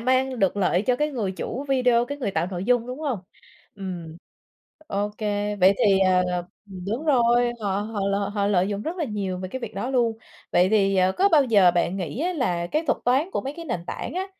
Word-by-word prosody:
mang 260 +1 +1
được 195 -2 +1
lợi 185 -2 +2
cho 245 +3 +1
cái 300 +3 0
người 220 -9 -2
chủ 250 +7 -5
video, 250 -3 +3
cái 285 +3 -6
người 245 -8 -2
tạo 190 - -1
nội 180 -1 -4
dung, 245 +1 +2
đúng 255 +2 -6
hông? 280 -8 -1 0.6
Ừm. 180 -5 -7 0.7
OK, 205 +1 -2 0.4
vậy 190 +2 +6
thì, 195 -2 +5
ờ 185 -1 +4 0.5
ừm, 185 -2 -8
đúng 230 +9 -3
rồi, 240 -3 +3
họ 200 -1 -1
họ 215 0 -4
l 200 - +1 0.2
họ 200 -1 +1
lợi 190 -2 +2
dụng 205 0 -3
rất 330 +8 -4
là 335 - -1
nhiều 200 -6 -3
về 185 0 -5
cái 260 +7 -6
việc - - -7
đó 250 - -3
luôn. 235 -4 +1 0.3
Vậy 180 +1 +4
thì, 195 -2 +2
ờ, 185 0 +3
có 390 - +3
bao 310 -6 +5
giờ 205 -7 +5
bạn 175 +1 0
nghĩ 180 - -4
á 355 +3 0
là 180 - -1
cái 305 - -1
thuật - - +1
toán 270 +9 +2
của - - -1
mấy 270 - -5
cái 335 - -7
nền 235 - -3
tảng - - -5
á, 375 +1 -2
215 Hz, 235 wpm, -24 LUFS, 190-260 Hz, 0.7 s, vậy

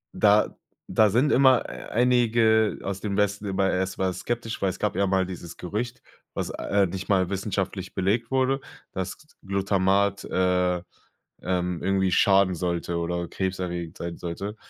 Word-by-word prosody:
Da 105 0 +4 0.3
da 110 -1 +4
sind 125 +8 +2
immer 130 -2 +5 0.3
einige 115 -2 +3
aus 100 0 -3
dem 100 -1 -3
Westen 105 0 0
immer 95 -1 +1
erstmal 95 0 -1
skeptisch. 120 +1 -4
Weil 95 - +2
es - - -5
gab 105 -3 -1
ja 100 +1 +2
mal 95 -1 +2
dieses 85 -2 -8
Gerücht- 110 +7 -4 0.3
was, - - -2
äh, 100 -1 +1
nicht 95 +3 -6
mal 95 -3 +3
wissenschaftlich 95 -1 -3
belegt 105 +5 0
wurde- 135 +1 +2 0.3
dass 95 -1 -4 0.3
Glutamat, 100 0 +1
äh, 90 -1 +1 0.6
ähm, 90 -1 -1
irgendwie 95 0 +1
schaden 95 0 +4
sollte 85 0 -2
oder 85 +1 -2
krebserregend 90 -3 -3
sein 85 0 -5
sollte. 95 +5 -5
95 Hz, 145 wpm, -25 LUFS, 90-105 Hz, 0.6 s, immer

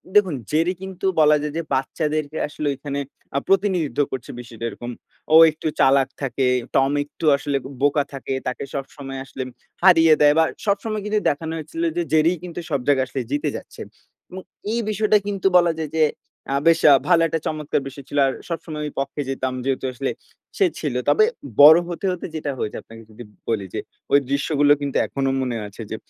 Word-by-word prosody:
দেখুন, 190 -8 +4 0.2
জেরি 165 +4 +2
কিন্তু 190 0 -6
বলা 150 0 +6
যায় 150 0 -4
যে - - 0
বাচ্চাদেরকে 150 +2 -2
আসলে 150 0 -5
এখানে 140 +1 -5 0.4
আ - - +3
প্রতিনিধিত্ব 185 - +1
করছে, 130 -3 -6
বিষয়টা 115 -1 -8
এরকম। 120 +3 -7 0.4
ও - - +8 0.2
একটু 155 +1 -5
চালাক 135 0 +4
থাকে, 135 0 -1 0.3
টম 135 +1 +3
একটু 150 +2 -8
আসলে 140 0 -1
ব - - -14 0.2
বোকা 145 0 +3
থাকে, 135 0 -4
তাকে 125 - -3
সবসময় 135 -1 -6
আসলে 130 - -6 0.4
হারিয়ে 165 -4 +7
দেয়। 145 0 +6
বা, 160 - +6 0.2
সবসময় 210 +1 -1
কিন্তু 210 0 +1
দেখানো 160 +2 -3
হয়েছিল 245 - -5
যে - - +2
জেরি 160 +2 +4
কিন্তু 175 -1 -6
সব 140 -3 0
জায়গায় 135 -2 +3
আসলে 130 0 -3
জিতে 145 0 0
যাচ্ছে - - -9 0.5
এবং 185 +1 -7 0.3
এই 235 - 0
বিষয়টা 215 0 +3
কিন্তু 195 -1 0
বলা 175 -1 +4
যায় 155 -2 -4
যে 155 - +5 0.5
আ - - +1
বেশ 165 0 +5
আ - - +9
ভালো 170 -2 +5
একটা 160 +1 -2
চমৎকার 150 -2 -2
বিষয় 135 0 -10
ছিল। 145 - -4
আর 135 - -1 0.2
সবসময় 160 -2 -5
আমি 150 - -4
পক্ষে 140 +1 -3
যেতাম, 130 -1 -2
যেহেতু 135 -1 -1
আসলে 135 +2 -2 0.5
সে 395 - +4
ছিল। 145 -5 -2 0.2
তবে 435 - +5 0.4
বড় 155 +3 +10
হতে, 175 +3 -5
হতে 180 - -5
যেটা 150 -2 -3
হয়েছে 105 - -3
আপনাকে 115 0 -14
যদি 120 +3 -10 0.3
বলি 105 -4 -1
যে, - - -2 0.3
ওই 140 - +7
দৃশ্যগুলো 145 +1 +3
কিন্তু 140 -1 -2
এখনো 135 -1 -1
মনে 125 -3 -2
আছে। 100 +3 -11
যে - - -2
145 Hz, 190 wpm, -22 LUFS, 135-165 Hz, 0.5 s, বড়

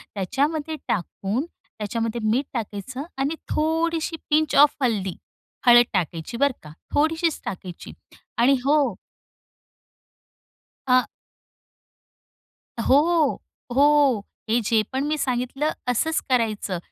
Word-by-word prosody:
त्याच्यामध्ये 290 - -1
टाकून, 200 - -2 0.2
त्याच्यामध्ये 230 +2 -4
मीठ 260 +5 +1
टाकायचं 235 +4 -5
आणि 280 +4 -1
थोडीशी 325 +1 0
पिंच 310 0 +2
ऑफ 290 +1 +6
हल्दी. 200 -7 0 0.5
हळद 240 0 +8
टाकायची, 175 +4 -2
बरं 280 -1 +1
का, 150 - -11 0.2
थोडीशीच 320 +2 +1
टाकायची. 180 -2 -7 0.4
आणि 250 +4 +5
हो 300 +2 +4 2.1
आ 255 0 +4 1.7
हो. 305 +4 +3 0.3
हो. 280 -6 +4 0.2
हे 235 +2 +3
जे 220 +1 +3
पण 265 +2 -1
मी 305 +1 0
सांगितलं, 255 +4 -1 0.2
असंच 320 +7 +1
करायचं, 220 -7 0
260 Hz, 100 wpm, -24 LUFS, 220-300 Hz, 2.1 s, हळद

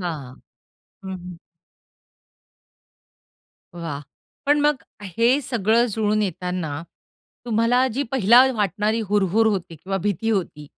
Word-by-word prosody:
हां. 150 -8 -5 0.7
हं. - - -5
हं. 180 -1 -10 2.4
वाह! 165 -5 -5 0.5
पण 295 +1 +4
मग 295 -2 +1 0.2
हे 230 - +2
सगळं 235 -2 +2
जुळून 215 0 0
येताना 180 -4 -3 0.6
तुम्हाला 240 +2 +2
जी 275 +4 -1
पहिले 250 +2 +6
वाटणारी 210 +2 0
हुरहूर 205 +2 +2
होती 190 -6 -1
किंवा 195 +5 -4
भीती 205 +3 -1
होती, 170 -7 -2
205 Hz, 105 wpm, -22 LUFS, 180-230 Hz, 2.4 s, पहिले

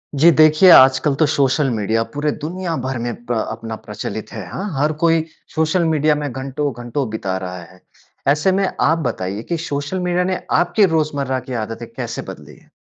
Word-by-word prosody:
जी 160 +5 +6
देखिए 155 +4 +6
आजकल 135 +1 +6
तो 155 - +3
सोशल 140 +1 +2
मीडिया 110 0 0
पूरे 150 +1 0
दुनिया 175 +1 -3
भर 130 -1 -2
में 120 0 -3
प्र 120 - -2 0.2
अपना 115 0 -6
प्रचलित 105 0 -7
है, 110 -4 -6
हाँ? 190 - -4 0.2
हर 150 +2 +2
कोई 165 -1 +4 0.3
सोशल 160 +3 +2
मीडिया 155 -1 +2
में 145 -2 -3
घंटो-घंटो 130 0 -3
बिता 95 -3 -2
रहा 90 0 -6
है। 90 +2 -16 0.5
ऐसे 150 +6 +3
में 195 +1 +1
आप 160 - +3
बताइए 100 0 -4
कि 170 - 0
सोशल 145 +6 -3
मीडिया 180 0 0
ने 185 0 -1 0.2
आपकी 175 +4 +3
रोज़मर्रा 145 -4 0
की 130 +1 -8
आदतें 115 +2 -7
कैसे 120 -3 -4
बदली 75 -5 -13
हैं? - - -23
140 Hz, 180 wpm, -19 LUFS, 115-160 Hz, 0.5 s, जी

